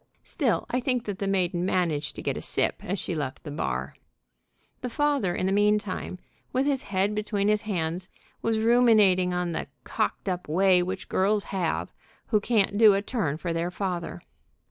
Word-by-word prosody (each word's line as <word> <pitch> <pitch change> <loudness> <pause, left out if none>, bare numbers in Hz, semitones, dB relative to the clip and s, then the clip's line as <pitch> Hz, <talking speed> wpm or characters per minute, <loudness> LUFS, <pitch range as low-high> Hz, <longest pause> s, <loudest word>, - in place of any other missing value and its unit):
Still, - - 0
I 250 - 0
think 250 -1 -1
that 200 -2 -4
the 200 - -1
maiden 180 -2 0
managed 175 -5 0
to - - -7
get - - -1
a - - -5
sip - - -1
as 195 +3 -2
she 180 - -4
left 145 -4 -4
the 150 - -7
bar. 150 - -3 0.9
The 250 - -3
father, 280 -8 +1
in - - -1
the 190 - +1
mean 205 +1 +4
time 195 -2 -5 0.3
with 260 +2 +1
his 280 -2 +1
head 195 +1 0
between 210 -1 0
his 210 0 +2
hands, 180 -3 -3 0.3
was 225 -1 +1
ruminating 220 -6 +4
on 180 -1 -1
the - - -3 0.2
"cocked - - -2
up 180 -1 -2
way 180 +3 +4
which 185 +1 -4
girls 205 +2 +1
have 180 -4 -1 0.4
who 215 - +3
can't 205 -2 +1
do 215 -3 +8
a 200 - -1
turn 200 - -1
for 170 +1 -3
their 165 +1 -1
father." 180 -2 -4
195 Hz, 190 wpm, -26 LUFS, 180-215 Hz, 0.9 s, do